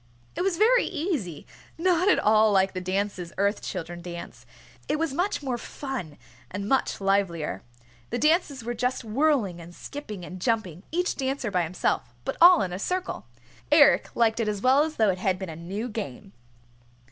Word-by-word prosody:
It - - -2
was 370 -2 0
very 475 +5 +4
easy, 295 - -3 0.3
not 360 +1 +2
at - - +5
all 215 0 +4
like 190 -1 +3
the 185 - -4
dances 185 -1 -2
Earth 200 +2 +1
Children 175 +1 -5
dance. 170 0 -9 0.4
It 300 - 0
was 320 -3 -1
much 355 0 -1
more 250 -3 -2
fun, 245 - -6 0.3
and 200 +2 -5
much 270 +3 +1
livelier. 195 -5 0 0.5
The - - -2
dances 305 -5 +2
were 240 +1 -3
just 250 +2 -1
whirling 225 - +1
and 170 +1 -12
skipping 215 -11 -7
and 185 +1 -9
jumping, 190 -7 -1
each 355 +2 0
dancer 265 -4 -2
by 180 -2 +2
himself, 165 -7 -2
but - - -2
all 355 0 +8
in 180 -2 -3
a 180 - -4
circle. 365 - -3 0.4
Eric - - +6
liked 230 -1 +2
it 225 - 0
as 210 -1 -1
well 260 +3 +5
as 310 0 -1
though 215 -3 +3
it 185 - -5
had 185 -1 +1
been 190 -2 -6
a 160 - -7
new 190 +8 -5
game. 200 - -6
215 Hz, 180 wpm, -26 LUFS, 185-290 Hz, 0.5 s, all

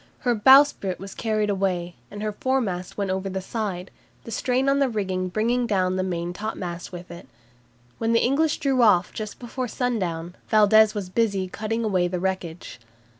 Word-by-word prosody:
Her 245 - +2
bowsprit 265 -4 +5
was 195 +1 -9
carried 215 -2 0
away, 180 -3 -1 0.2
and 205 +1 -7
her 215 - -1
foremast 205 -7 -2
went 200 -2 -1
over 190 +1 -2
the 190 0 -3
side, 190 -2 -4 0.3
the 230 - -9
strain 255 +3 0
on 275 0 +3
the 275 -2 +2
rigging 190 -4 -2
bringing 235 +5 0
down 185 -3 +1
the 185 - 0
main 175 -2 -3
topmast 180 -4 -5
with 175 -1 -9
it. 170 +1 -10 0.7
When 225 0 0
the 230 - +3
English 295 +5 +2
drew 270 -3 +1
off 195 -6 +4
just 215 -1 -6
before 250 +1 -5
sundown, 180 -10 -2 0.2
Valdes 215 0 +5
was 200 -3 -4
busy 200 -3 0
cutting 220 +4 -3
away 185 -5 +1
the 180 0 -3
wreckage. 180 -6 -4
205 Hz, 175 wpm, -24 LUFS, 185-230 Hz, 0.7 s, bowsprit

